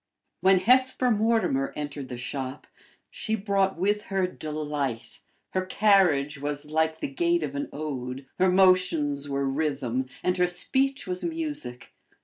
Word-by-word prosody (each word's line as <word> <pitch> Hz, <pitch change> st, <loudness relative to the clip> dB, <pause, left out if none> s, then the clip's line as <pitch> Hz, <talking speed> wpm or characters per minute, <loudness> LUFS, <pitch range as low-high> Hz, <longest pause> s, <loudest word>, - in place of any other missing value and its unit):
When 190 Hz, -1 st, +4 dB
Hesper 255 Hz, +3 st, +4 dB
Mortimer 215 Hz, -11 st, +1 dB
entered 145 Hz, -2 st, -5 dB
the 125 Hz, -, -6 dB
shop, 130 Hz, +2 st, -5 dB, 0.5 s
she 220 Hz, -, -2 dB
brought 195 Hz, -3 st, 0 dB
with 205 Hz, +4 st, 0 dB
her 195 Hz, -2 st, 0 dB
delight; 150 Hz, -7 st, -4 dB, 0.3 s
her 185 Hz, -, 0 dB
carriage 185 Hz, -8 st, +3 dB
was 145 Hz, 0 st, -3 dB
like 160 Hz, +1 st, 0 dB
the -, -, -1 dB
gait 170 Hz, +4 st, +1 dB
of 145 Hz, -2 st, -3 dB
an 140 Hz, 0 st, -3 dB
ode; 135 Hz, -3 st, -5 dB
her 185 Hz, +1 st, +4 dB
motions 180 Hz, -7 st, +3 dB
were 140 Hz, 0 st, -1 dB
rhythm; 135 Hz, -3 st, -1 dB, 0.2 s
and 180 Hz, 0 st, +1 dB
her 180 Hz, 0 st, +3 dB
speech 265 Hz, +10 st, 0 dB
was 180 Hz, 0 st, -3 dB
music. 305 Hz, -, -4 dB
160 Hz, 140 wpm, -26 LUFS, 140-195 Hz, 0.5 s, When